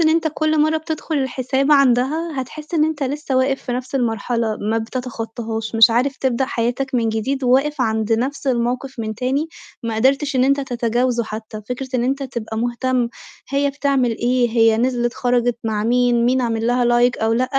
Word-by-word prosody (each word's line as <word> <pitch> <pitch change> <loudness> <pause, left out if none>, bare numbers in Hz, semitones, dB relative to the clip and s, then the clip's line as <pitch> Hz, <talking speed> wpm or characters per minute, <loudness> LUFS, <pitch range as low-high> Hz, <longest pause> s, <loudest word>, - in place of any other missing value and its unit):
إن 320 - +4
أنت 320 0 +2
كُلّ 310 -1 +1
مرّه 310 +1 +3
بتدخُل 315 0 -4
الحساب 265 +2 0
عندها 275 +3 +2
هتحس 305 +5 -8
إن 305 -1 +4
أنت 310 -2 -2
لسه 275 0 -2
واقف 270 +1 +1
في 250 - -4
نَفْس 255 +2 -5
المرحلة، 230 -2 -1
ما 220 +2 -1
بتتخطّهاش، 225 -2 -5
مش 225 0 +7
عارف 255 +4 +1
تبدأ 265 0 0
حياتك 250 +2 -2
من 230 -2 +2
جديد 255 +5 -2
وواقف 270 +3 +2
عند 220 -1 0
نَفْس 265 +5 -1
الموقِف 250 +1 -1
من 220 -1 -3
تاني، 265 +7 -1 0.3
ما 230 -1 -3
قدرتش 270 +4 +1
إن 255 - +4
أنت 275 +1 +2
تتجاوزُه 240 -1 0
حتى، 215 0 -7
فكرة 255 +1 -4
إن 240 -1 +1
أنت 270 +2 -1
تبقى 235 -4 -5
مهتم 245 +1 0 0.4
هي 280 0 +1
بتعمل 275 -3 +1
إيه، 245 0 +2
هي 225 -1 +4
نزلِت 240 0 0
خَرَجِت 245 -1 +1
مع 215 -1 -1
مين، 245 0 +2
مين 255 +2 +2
عامل 230 -2 -1
لها 245 0 +2
لايك 240 +1 +3
أو 220 0 +1
لأ، 240 +3 +2
250 Hz, 185 wpm, -20 LUFS, 230-275 Hz, 0.4 s, مش